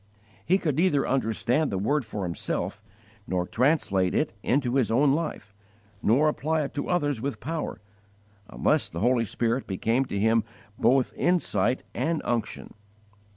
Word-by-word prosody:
He 185 Hz, -, +3 dB
could 155 Hz, -7 st, -1 dB
neither 165 Hz, -5 st, +2 dB
understand 130 Hz, +3 st, +1 dB
the 95 Hz, -, -2 dB
Word 140 Hz, +9 st, +1 dB
for 105 Hz, -2 st, -5 dB
himself, 90 Hz, +3 st, -3 dB, 0.5 s
nor 90 Hz, -1 st, 0 dB
translate 110 Hz, -, +1 dB
it -, -, 0 dB
into 125 Hz, -2 st, +1 dB
his 130 Hz, -4 st, +2 dB
own 135 Hz, +5 st, +4 dB
life, 150 Hz, -, -3 dB, 0.5 s
nor 135 Hz, +8 st, +3 dB
apply 155 Hz, +1 st, 0 dB
it 140 Hz, -, -5 dB
to 145 Hz, -, -3 dB
others 145 Hz, -9 st, 0 dB
with 140 Hz, +2 st, -3 dB
power, 160 Hz, +4 st, -4 dB, 0.7 s
unless -, -, +1 dB
the 85 Hz, -, -5 dB
Holy 120 Hz, 0 st, +3 dB
Spirit 115 Hz, +4 st, -1 dB
became 115 Hz, +7 st, 0 dB
to 100 Hz, -, -4 dB
him 110 Hz, +2 st, +3 dB, 0.4 s
both 125 Hz, +2 st, +3 dB
insight 130 Hz, -, +1 dB
and 165 Hz, 0 st, -1 dB
_unction. 120 Hz, -2 st, -3 dB
125 Hz, 150 wpm, -26 LUFS, 110-150 Hz, 0.7 s, own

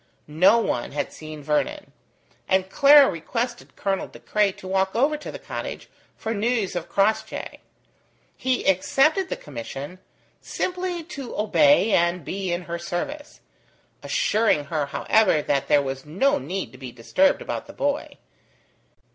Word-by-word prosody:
No 165 Hz, +9 st, +4 dB
one 130 Hz, -, -1 dB
had 145 Hz, -1 st, -3 dB
seen 155 Hz, -1 st, -9 dB
Vernon, 155 Hz, -, -1 dB, 0.6 s
and 190 Hz, 0 st, +1 dB
Clara 285 Hz, +2 st, +7 dB
requested 230 Hz, +9 st, -4 dB
Colonel 195 Hz, -1 st, -2 dB
De -, -, -14 dB
Craye 210 Hz, -2 st, +1 dB
to 185 Hz, -, -11 dB
walk 190 Hz, +1 st, 0 dB
over 280 Hz, +6 st, +2 dB
to 300 Hz, -, -8 dB
the -, -, -7 dB
cottage -, -, -7 dB, 0.3 s
for 225 Hz, 0 st, -3 dB
news 225 Hz, -2 st, 0 dB
of 175 Hz, -1 st, -4 dB
Crossjay. 200 Hz, +2 st, -1 dB, 0.8 s
He 260 Hz, -1 st, -1 dB
accepted 305 Hz, -, +3 dB
the -, -, -2 dB
commission, 140 Hz, +6 st, -8 dB, 0.4 s
simply 360 Hz, -2 st, -3 dB
to 280 Hz, -6 st, -8 dB
obey 225 Hz, +2 st, +4 dB
and 170 Hz, -3 st, +2 dB
be 190 Hz, -1 st, -3 dB
in 175 Hz, +1 st, -2 dB
her 170 Hz, 0 st, -5 dB
service: 280 Hz, -, -5 dB, 0.6 s
assuring 215 Hz, -9 st, +1 dB
her, 150 Hz, -3 st, 0 dB
however, 185 Hz, +1 st, +2 dB
that 140 Hz, -1 st, 0 dB
there 145 Hz, -1 st, +4 dB
was 135 Hz, 0 st, -4 dB
no 270 Hz, -, +1 dB
need 190 Hz, -5 st, -4 dB
to 130 Hz, -, -15 dB
be 130 Hz, -2 st, -7 dB
disturbed 130 Hz, -, +2 dB
about -, -, -5 dB
the -, -, -11 dB
boy. 285 Hz, +1 st, -2 dB
195 Hz, 145 wpm, -24 LUFS, -, 0.8 s, Clara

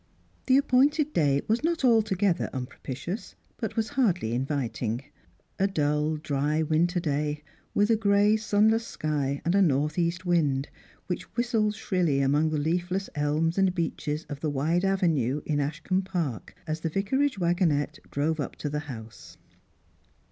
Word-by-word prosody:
The 260 Hz, 0 st, +6 dB
appointed 285 Hz, +3 st, +3 dB
day 140 Hz, -3 st, +2 dB
was 225 Hz, +5 st, +1 dB
not 330 Hz, -4 st, +1 dB
altogether 205 Hz, -6 st, +2 dB
unpropitious, 135 Hz, -, -6 dB, 0.2 s
but -, -, -4 dB
waa 225 Hz, -, +3 dB
hardly 180 Hz, -, +1 dB
inviting: 125 Hz, -2 st, -2 dB, 0.6 s
a 195 Hz, -, +3 dB
dull 150 Hz, -3 st, 0 dB
dry 150 Hz, +1 st, 0 dB
winter 170 Hz, +3 st, +1 dB
day, 150 Hz, -2 st, -2 dB, 0.3 s
with 205 Hz, +2 st, +3 dB
a -, -, +5 dB
gray 205 Hz, 0 st, +3 dB
sunless 220 Hz, +1 st, +2 dB
sky 145 Hz, -2 st, -2 dB
and 170 Hz, -, +2 dB
a 200 Hz, -, +4 dB
north 150 Hz, -1 st, +2 dB
east 170 Hz, +2 st, -1 dB
wind, 150 Hz, -6 st, +1 dB, 0.4 s
which -, -, -5 dB
whistled 225 Hz, -3 st, +1 dB
shrilly 180 Hz, -9 st, 0 dB
among 145 Hz, +3 st, +2 dB
the 155 Hz, -, -1 dB
leaf 170 Hz, +4 st, 0 dB
less 195 Hz, +1 st, -2 dB
elms 155 Hz, +4 st, 0 dB
and 190 Hz, -1 st, +2 dB
beeches 160 Hz, -2 st, -2 dB
of 145 Hz, -2 st, -6 dB
the 155 Hz, -, -1 dB
wide 155 Hz, +6 st, 0 dB
avenue 160 Hz, -9 st, +1 dB
in 150 Hz, -2 st, 0 dB
Ashcombe 165 Hz, +6 st, -1 dB
Park 170 Hz, -, -3 dB
a« 155 Hz, -, -2 dB
the 165 Hz, -, -1 dB
vicarage 260 Hz, -, 0 dB
wagonette 170 Hz, -5 st, +1 dB
drove 155 Hz, +3 st, -1 dB
up 145 Hz, -, -3 dB
to 145 Hz, -, -4 dB
the 150 Hz, -, -1 dB
house. 110 Hz, -3 st, -10 dB
165 Hz, 155 wpm, -27 LUFS, 145-195 Hz, 0.6 s, The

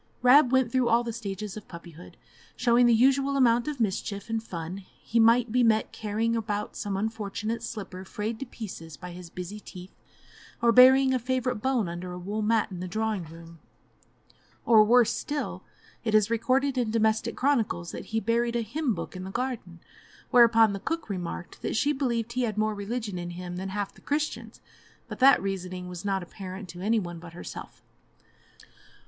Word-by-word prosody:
Rab 255 Hz, +1 st, +7 dB
went 260 Hz, -3 st, +3 dB
through 255 Hz, -1 st, +2 dB
all 235 Hz, +1 st, +4 dB
the 235 Hz, -1 st, -4 dB
stages 205 Hz, -2 st, -5 dB
of 215 Hz, -, -9 dB
puppyhood, 170 Hz, 0 st, -12 dB, 0.4 s
showing 245 Hz, 0 st, +4 dB
the -, -, +5 dB
usual 270 Hz, +3 st, +3 dB
amount 240 Hz, -1 st, +3 dB
of 295 Hz, -3 st, -3 dB
mischief 200 Hz, 0 st, -2 dB
and 225 Hz, -1 st, 0 dB
fun; 170 Hz, -3 st, -6 dB, 0.2 s
he 230 Hz, -, -1 dB
might 230 Hz, +1 st, +4 dB
be 250 Hz, +2 st, +3 dB
met 220 Hz, -2 st, +2 dB
carrying 225 Hz, +2 st, -1 dB
about 210 Hz, -2 st, -3 dB
some 200 Hz, -2 st, -3 dB
unfortunate 220 Hz, +1 st, -3 dB
slipper 195 Hz, -5 st, -6 dB
frayed 215 Hz, +3 st, -4 dB
to 270 Hz, -, -5 dB
pieces 165 Hz, -10 st, -8 dB
by 180 Hz, -1 st, -8 dB
his 175 Hz, -1 st, -10 dB
busy 185 Hz, +4 st, -7 dB
teeth, 185 Hz, -2 st, -11 dB, 0.7 s
or 235 Hz, 0 st, +4 dB
burying 260 Hz, +2 st, +7 dB
a 255 Hz, -, +1 dB
favourite 250 Hz, -2 st, -1 dB
bone 255 Hz, -6 st, +1 dB
under 175 Hz, +1 st, -6 dB
a -, -, -6 dB
wool 200 Hz, +4 st, -4 dB
mat 215 Hz, -1 st, +1 dB
in 180 Hz, -, -6 dB
the 185 Hz, -, -4 dB
drawing 215 Hz, -1 st, -2 dB
room, 165 Hz, +1 st, -13 dB, 1.1 s
or, 220 Hz, -2 st, +7 dB
worse 235 Hz, +1 st, +4 dB
still, 290 Hz, 0 st, -4 dB, 0.4 s
it 220 Hz, -2 st, +1 dB
is 215 Hz, +1 st, +4 dB
recorded 255 Hz, +4 st, +1 dB
in 235 Hz, -3 st, 0 dB
domestic 220 Hz, +1 st, +1 dB
chronicles 225 Hz, -11 st, 0 dB
that -, -, -7 dB
he 225 Hz, -, -1 dB
buried 235 Hz, +2 st, 0 dB
a 235 Hz, -, +1 dB
hymn 240 Hz, +2 st, -1 dB
book 170 Hz, +2 st, -6 dB
in 185 Hz, -, -6 dB
the 190 Hz, -, -6 dB
garden, 235 Hz, -7 st, -4 dB, 0.5 s
whereupon 225 Hz, -3 st, +6 dB
the 200 Hz, -, -4 dB
cook 325 Hz, -1 st, -3 dB
remarked 175 Hz, -2 st, -6 dB
that -, -, -2 dB
she 290 Hz, +6 st, +2 dB
believed 235 Hz, -4 st, -1 dB
he 255 Hz, -, 0 dB
had 220 Hz, -4 st, -1 dB
more 215 Hz, 0 st, +1 dB
religion 205 Hz, -1 st, -4 dB
in 175 Hz, 0 st, -5 dB
him 175 Hz, 0 st, -7 dB
than 190 Hz, +1 st, -4 dB
half 200 Hz, +1 st, -3 dB
the -, -, -19 dB
Christians; 295 Hz, +1 st, -3 dB, 0.5 s
but -, -, -8 dB
that 270 Hz, 0 st, +7 dB
reasoning 185 Hz, -2 st, -4 dB
was 180 Hz, 0 st, -7 dB
not 195 Hz, -2 st, -1 dB
apparent 185 Hz, +1 st, -8 dB
to 175 Hz, +1 st, -9 dB
any 220 Hz, +3 st, +2 dB
one 175 Hz, -3 st, -6 dB
but 170 Hz, -1 st, -11 dB
herself. 175 Hz, -, -9 dB
220 Hz, 190 wpm, -27 LUFS, 190-240 Hz, 1.1 s, Rab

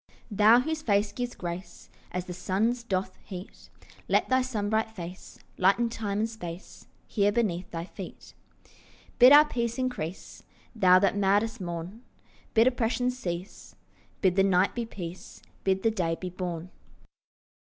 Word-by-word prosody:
Thou 215 Hz, +4 st, +6 dB
whose 315 Hz, +3 st, -3 dB
face 205 Hz, -5 st, +1 dB
gives 245 Hz, +3 st, -4 dB
grace 175 Hz, 0 st, -7 dB, 0.2 s
As 180 Hz, 0 st, -3 dB
the 180 Hz, -, -6 dB
sun's 205 Hz, +7 st, 0 dB
doth 195 Hz, -4 st, -2 dB
heat, 185 Hz, +1 st, -10 dB, 0.4 s
Let -, -, +2 dB
thy 260 Hz, 0 st, +4 dB
sunbright 220 Hz, -3 st, -1 dB
face 180 Hz, -3 st, -9 dB, 0.2 s
Lighten 200 Hz, +6 st, +3 dB
time 210 Hz, -3 st, -3 dB
and 220 Hz, +2 st, +1 dB
space 180 Hz, -5 st, -9 dB, 0.2 s
Here 205 Hz, -2 st, +1 dB
beneath 195 Hz, -6 st, -1 dB
thy 165 Hz, 0 st, -5 dB
feet. -, -, -10 dB, 0.9 s
Bid 250 Hz, +2 st, +9 dB
our 295 Hz, +1 st, +9 dB
peace 235 Hz, -4 st, -2 dB
increase, 245 Hz, -10 st, -4 dB, 0.3 s
Thou 185 Hz, -4 st, +6 dB
that 195 Hz, +1 st, +2 dB
madest 205 Hz, +3 st, +1 dB
morn; 175 Hz, +5 st, -6 dB, 0.5 s
Bid 225 Hz, +1 st, +6 dB
oppressions 250 Hz, 0 st, +1 dB
cease; 180 Hz, -6 st, -6 dB, 0.5 s
Bid 185 Hz, -3 st, +3 dB
the 195 Hz, -, +4 dB
night 190 Hz, 0 st, +3 dB
be 235 Hz, -2 st, -3 dB
peace; 180 Hz, -4 st, -8 dB, 0.2 s
Bid 190 Hz, 0 st, +1 dB
the 225 Hz, -, +3 dB
day 170 Hz, -6 st, -1 dB
be 180 Hz, -1 st, -5 dB
born. 180 Hz, -1 st, -5 dB
200 Hz, 145 wpm, -28 LUFS, 180-230 Hz, 0.9 s, Bid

